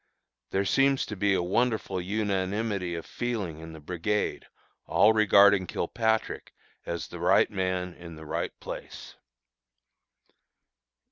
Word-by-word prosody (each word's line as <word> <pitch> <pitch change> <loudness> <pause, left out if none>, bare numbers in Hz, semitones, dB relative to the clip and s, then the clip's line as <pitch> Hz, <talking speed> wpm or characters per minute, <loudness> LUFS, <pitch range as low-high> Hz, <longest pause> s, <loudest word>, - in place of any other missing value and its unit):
There 95 +1 0
seems 135 +4 +3
to 105 - -6
be 100 0 +2
a 90 - 0
wonderful 110 0 0
unanimity 100 -1 -1
of 85 - -6
feeling 105 -10 -3
in 80 0 -9
the 80 - -10
brigade, 90 +7 -2 0.4
all 110 +2 +5
regarding 100 -3 +5
Kilpatrick 110 +6 -1 0.3
as 85 -1 -3
the - - -8
right - - +4
man 95 -2 -2
in 85 -2 -11
the 80 0 -11
right - - -4
place. - - -8
95 Hz, 125 wpm, -28 LUFS, 90-110 Hz, 0.4 s, all